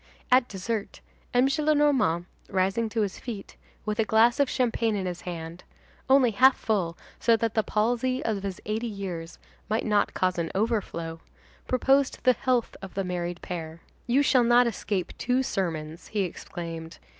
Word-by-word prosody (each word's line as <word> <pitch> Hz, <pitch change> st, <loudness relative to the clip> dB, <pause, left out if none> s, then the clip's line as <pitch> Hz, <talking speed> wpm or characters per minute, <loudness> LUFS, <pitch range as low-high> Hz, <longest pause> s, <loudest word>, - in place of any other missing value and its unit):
At 250 Hz, -1 st, +5 dB
dessert, 205 Hz, +2 st, -4 dB, 0.3 s
M. 250 Hz, +1 st, +4 dB
Gillenormand, 280 Hz, -, +2 dB, 0.2 s
rising 195 Hz, +4 st, +1 dB
to 220 Hz, +1 st, -1 dB
his 200 Hz, -3 st, -2 dB
feet, 220 Hz, -6 st, -7 dB, 0.3 s
with 215 Hz, +1 st, -2 dB
a -, -, +5 dB
glass 220 Hz, +4 st, +4 dB
of 280 Hz, -2 st, +3 dB
champagne 230 Hz, -3 st, +1 dB
in 195 Hz, -2 st, -2 dB
his 175 Hz, -1 st, -4 dB
hand—only 180 Hz, +9 st, -1 dB
half 255 Hz, +5 st, +5 dB
full 185 Hz, -7 st, -1 dB, 0.2 s
so 230 Hz, -1 st, +4 dB
that 225 Hz, -1 st, -1 dB
the 220 Hz, -, +3 dB
palsy 240 Hz, +5 st, 0 dB
of 215 Hz, -3 st, -1 dB
his 195 Hz, -2 st, -4 dB
eighty 220 Hz, +3 st, -2 dB
years 185 Hz, -6 st, -6 dB, 0.3 s
might 220 Hz, +1 st, 0 dB
not 210 Hz, -2 st, +1 dB
cause 185 Hz, -1 st, +1 dB
an 165 Hz, -1 st, -1 dB
overflow,—proposed 225 Hz, +6 st, -1 dB
the 255 Hz, -, +6 dB
health 250 Hz, -1 st, 0 dB
of 195 Hz, -2 st, -9 dB
the 195 Hz, -, 0 dB
married 175 Hz, -1 st, -4 dB
pair. 165 Hz, -2 st, -6 dB, 0.3 s
"You 260 Hz, +4 st, +4 dB
shall 255 Hz, -2 st, +4 dB
not 240 Hz, +1 st, +5 dB
escape 205 Hz, -5 st, -2 dB
two 255 Hz, +1 st, +1 dB
sermons," 165 Hz, -7 st, -3 dB
he 210 Hz, -, -1 dB
exclaimed. 165 Hz, -2 st, -6 dB
215 Hz, 155 wpm, -27 LUFS, 180-245 Hz, 0.3 s, the